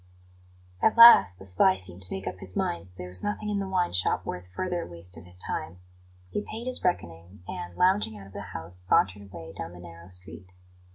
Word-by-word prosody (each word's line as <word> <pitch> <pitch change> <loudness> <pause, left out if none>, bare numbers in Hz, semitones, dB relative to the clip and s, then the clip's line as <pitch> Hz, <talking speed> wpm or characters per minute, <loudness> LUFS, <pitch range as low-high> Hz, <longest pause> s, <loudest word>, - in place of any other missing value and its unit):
At 220 - +3
last 100 - +9
the 95 - -12
spy 95 0 +4
seemed 95 -1 -5
to 90 - 0
make 95 0 -4
up 95 0 -5
his 95 0 -6
mind 85 +1 -2
that 90 0 -23
there 90 - -6
was 90 0 -3
nothing 210 +1 -3
in 205 - 0
the 195 - -3
wine 185 -2 0
shop 90 +1 +1
worth 90 0 -5
further 175 - -3
waste 85 +1 -7
of - - -12
his 90 0 -12
time. 90 -1 -4 0.5
He - - -1
paid 220 +3 -7
his 255 0 -2
reckoning, 85 - -3
and, 90 0 -7
lounging 180 - +2
out 100 - -11
of 95 - -15
the - - -6
house, 85 -2 -5
sauntered 95 +2 +2
away 80 -2 -9
down 85 - -6
the 90 - -12
narrow 85 0 -12
street. 90 0 -8
90 Hz, 220 wpm, -27 LUFS, 90-125 Hz, 0.5 s, last